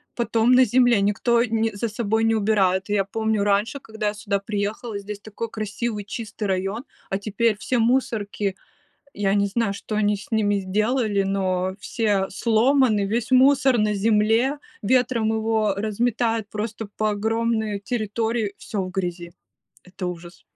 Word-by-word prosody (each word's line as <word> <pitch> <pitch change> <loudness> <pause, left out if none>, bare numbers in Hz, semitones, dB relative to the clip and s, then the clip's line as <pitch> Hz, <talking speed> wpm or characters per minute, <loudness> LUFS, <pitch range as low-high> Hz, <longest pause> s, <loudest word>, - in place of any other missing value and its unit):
потом 235 0 +2
на 255 +1 +7
земле, 245 -2 +4
никто 235 +4 +2
не 225 -1 0
за 230 +3 -2
собой 220 0 0
не 225 0 +3
убирает. 195 -3 +2
Я 205 -1 +2
помню, 220 +1 -1
раньше, 205 +6 +1
когда 220 -3 -4
я 205 - 0
сюда 205 -1 -2
приехала, 205 +2 -3
здесь 200 0 -7
такой 215 +2 -6
красивый 215 0 -3
чистый 215 0 -6
район, 195 +5 -2 0.3
а 195 - 0
теперь 215 +1 0
все 250 - -1
мусорки, 220 -5 0 0.6
я 200 -1 0
не 200 0 +2
знаю, 210 0 -1
что 210 +2 -6
они 210 -1 +2
с 200 -1 -11
ними 205 -3 +1
сделали, 210 +2 0
но 190 -1 -1
все 205 -3 0
сломаны, 230 0 +2
весь 235 +4 -2
мусор 265 -1 +5
на 210 0 +1
земле, 225 +7 +2 0.2
ветром 245 -1 +2
его 220 -2 +1
разметает 225 +1 0
просто 215 0 -4
по 215 0 +1
огромной 220 0 -1
территории, 220 -1 -2
всё 200 -3 -3
в 185 - -5
грязи. 175 -2 -4 0.5
Это 180 0 -6
ужас! 175 0 -8
215 Hz, 150 wpm, -23 LUFS, 200-230 Hz, 0.6 s, на